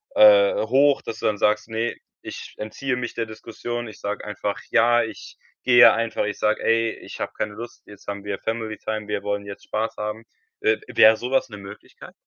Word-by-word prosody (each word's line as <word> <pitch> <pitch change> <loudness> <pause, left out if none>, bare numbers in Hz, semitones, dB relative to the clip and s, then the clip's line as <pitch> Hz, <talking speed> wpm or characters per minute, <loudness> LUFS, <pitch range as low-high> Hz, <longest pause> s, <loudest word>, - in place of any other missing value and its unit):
äh, - - +7
hoch“, 140 +1 +3
dass 115 0 -7
du - - 0
dann 105 - 0
sagst: 105 +2 +1
„Ne, 115 +1 -2 0.3
ich - - -9
entziehe 125 +5 -3
mich 120 -1 -4
der 115 - -1
Diskussion. 120 +2 -6
Ich 110 - -12
sage 105 0 -4
einfach: 105 -1 -3
‚Ja, 120 +1 +4
ich 115 - -9 0.3
gehe 120 -1 +8
einfach.‘ 115 -2 -1
Ich 105 - -4
sage: 105 - +1
‚Ey, 115 0 +2
ich - - -10
hab - - -3
keine 105 - -3
Lust, 115 +2 -9
jetzt 105 -1 -15
haben 100 0 -5
wir 100 -1 -3
Family 110 -2 -3
Time, 110 -1 -4
wir 105 -1 -3
wollen 100 0 -2
jetzt 100 -1 -9
Spaß 110 +1 -2
haben.‘“ 105 +2 -5 0.4
Äh, 110 0 +3
w - - -12
wäre 110 +1 +8
so 125 +2 -5
was 135 - +2
'ne 105 - -9
Möglichkeit? 100 +1 -12
110 Hz, 210 wpm, -23 LUFS, 105-120 Hz, 0.4 s, gehe